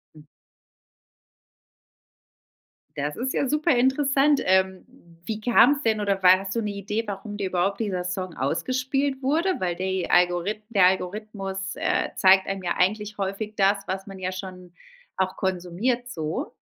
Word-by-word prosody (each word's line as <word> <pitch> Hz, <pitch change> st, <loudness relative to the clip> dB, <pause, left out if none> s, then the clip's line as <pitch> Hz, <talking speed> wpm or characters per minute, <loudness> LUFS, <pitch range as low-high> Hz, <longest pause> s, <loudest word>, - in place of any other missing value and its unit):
Hm. 150 Hz, -1 st, -15 dB, 2.7 s
Das 145 Hz, +1 st, -3 dB
ist 260 Hz, +2 st, -2 dB
ja 280 Hz, -, 0 dB
super 300 Hz, +1 st, +2 dB
interessant. 275 Hz, +3 st, +3 dB
Ähm, 190 Hz, 0 st, +2 dB, 0.4 s
wie 215 Hz, +1 st, -4 dB
kam's 250 Hz, +5 st, +4 dB
denn 220 Hz, -5 st, +1 dB
oder 200 Hz, -2 st, -1 dB
war 185 Hz, 0 st, +7 dB
hast 195 Hz, -1 st, -5 dB
du 230 Hz, -, 0 dB
'ne 210 Hz, -2 st, -2 dB
Idee, 205 Hz, +3 st, -3 dB
warum 205 Hz, +1 st, -6 dB
dir 200 Hz, -2 st, -2 dB
überhaupt 185 Hz, +2 st, 0 dB
dieser 185 Hz, -5 st, -2 dB
Song 180 Hz, -1 st, -4 dB
ausgespielt 260 Hz, -, -1 dB
wurde? 310 Hz, +8 st, +1 dB
Weil 175 Hz, -2 st, -1 dB
die 190 Hz, 0 st, -2 dB
Algorith 175 Hz, +4 st, +2 dB
der 200 Hz, -5 st, +4 dB
Algorithmus, 195 Hz, +1 st, -3 dB, 0.2 s
äh, -, -, 0 dB
zeigt 190 Hz, 0 st, +5 dB
einem 195 Hz, -1 st, -4 dB
ja 175 Hz, -, -2 dB
eigentlich 210 Hz, +3 st, 0 dB
häufig 200 Hz, +2 st, -3 dB
das, 195 Hz, 0 st, +2 dB
was 190 Hz, +1 st, -4 dB
man 195 Hz, -1 st, -9 dB
ja 185 Hz, 0 st, -2 dB
schon 185 Hz, -1 st, -8 dB, 0.5 s
auch 190 Hz, 0 st, 0 dB
konsumiert 190 Hz, +7 st, -2 dB
so? 160 Hz, -8 st, -4 dB
195 Hz, 150 wpm, -25 LUFS, 185-230 Hz, 2.7 s, war